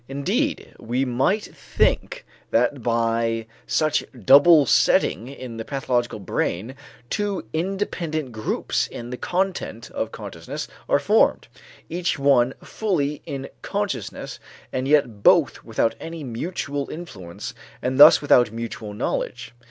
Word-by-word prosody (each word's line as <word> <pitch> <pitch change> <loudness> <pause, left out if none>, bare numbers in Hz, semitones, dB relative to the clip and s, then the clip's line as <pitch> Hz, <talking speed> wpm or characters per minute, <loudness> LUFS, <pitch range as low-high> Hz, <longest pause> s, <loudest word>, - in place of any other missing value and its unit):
Indeed 140 +1 -1
we 125 +4 -1
might 135 - +1
think - - -1 0.2
that 125 +3 +1
by 115 -1 0 0.2
such 155 -1 +1 0.2
double 145 - +7
setting 115 -2 +3
in 130 -4 -8
the 115 - -4
pathological 125 -3 -1
brain 100 +3 -2 0.4
two 205 - -1
independent 165 -5 -2
groups 110 -1 -1
in 120 +1 -8
the 125 - -4
content 180 - -2
of 110 - -3
consciousness 95 -6 -7 0.2
are - - +5
formed, - - +2 0.4
each 175 0 -1
one 135 -3 +3
fully 150 -9 -1
in 135 -1 -5
consciousness - - -4 0.3
and 130 +1 -1
yet 130 -8 +2
both - - +4
without 115 - 0
any 165 -1 -7
mutual 140 +2 -4
influence 105 - -8 0.3
and 130 +2 -2
thus 155 +1 +9
without 120 -5 +5
mutual 115 -2 -6
knowledge. 120 +1 -3
130 Hz, 120 wpm, -23 LUFS, 115-155 Hz, 0.4 s, thus